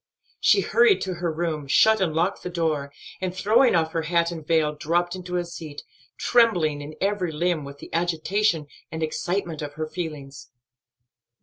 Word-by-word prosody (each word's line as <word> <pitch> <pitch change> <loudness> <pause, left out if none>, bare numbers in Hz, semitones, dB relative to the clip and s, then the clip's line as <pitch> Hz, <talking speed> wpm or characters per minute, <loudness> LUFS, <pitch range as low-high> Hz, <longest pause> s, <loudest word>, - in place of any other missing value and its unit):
She - - +4
hurried 450 -4 +4
to 190 - -2
her 175 -1 -2
room, 155 -3 -3
shut 220 +9 +4
and 180 -4 +1
locked 175 +4 0
the 180 - -5
door, 155 -5 -1 0.3
and, 185 -1 -3
throwing 220 +5 +4
off 160 -1 +1
her 165 - -1
hat 170 +1 +1
and 165 -2 -7
veil, 155 -1 +2
dropped 175 +4 -1
into 180 -1 -4
a 175 - -1
seat, 160 -4 -8 0.3
trembling 175 -12 +3
in 150 +2 -8
every 195 -3 0
limb 165 0 0
with 140 0 -9
the - - -12
agitation 170 +1 +1 0.3
and 160 0 -3
excitement 170 0 -2
of 145 -1 -5
her 155 +1 -3
feelings. 150 -5 -7
170 Hz, 175 wpm, -24 LUFS, 155-180 Hz, 0.3 s, She